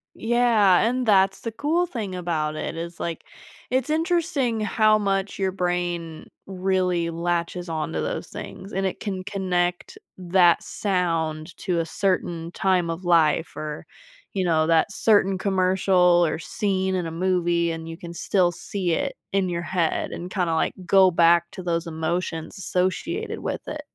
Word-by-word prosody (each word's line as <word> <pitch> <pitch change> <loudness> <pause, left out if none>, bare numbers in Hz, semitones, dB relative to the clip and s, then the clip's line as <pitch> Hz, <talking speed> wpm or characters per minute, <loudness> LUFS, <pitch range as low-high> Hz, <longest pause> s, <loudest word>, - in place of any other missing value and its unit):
Yeah, 225 -5 +4
and 250 +2 +1
that's 195 -3 +4
the 230 - -5
cool 320 +8 +1
thing 220 - -5
about 160 -4 -2
it - - -4
is 170 +1 -6
like, 170 -1 -4 0.5
it's 260 +2 0
interesting 315 -7 0
how 215 0 +3
much 195 -1 -1
your 190 -1 0
brain 175 -3 -3 0.2
really 185 -2 0
latches 170 +1 -2
onto 160 0 -2
those - - -3
things 195 +3 -9
and 195 0 -1
it 190 - -2
can 190 -3 -4
connect 180 -3 -2 0.2
that 180 -1 +4
sound 165 -4 -2
to 180 -3 -1
a 165 - 0
certain 170 -2 -1
time 180 -2 +1
of 165 +2 -5
life 165 -2 +3
or, 150 -1 -6 0.5
you 190 - 0
know, 160 -3 +2
that 165 +4 +3
certain 200 -2 +3
commercial 185 -2 +3
or 160 0 -2
scene 190 +1 -1
in 180 -2 -1
a 165 - -4
movie 170 -1 +1
and 165 0 -6
you 165 - -6
can 170 0 -9
still 180 0 +1
see 180 +1 -3
it 165 - -1 0.2
in 195 -1 +1
your 170 -1 -2
head 175 -2 -1
and 175 +1 -6
kinda, 180 -4 0
like, 160 - +1
go 190 0 +6
back 170 0 +4
to 185 - -8
those 170 -1 -1
emotions 165 +2 -3
associated 195 - -2
with - - -3
it. - - -5
180 Hz, 160 wpm, -24 LUFS, 170-195 Hz, 0.5 s, go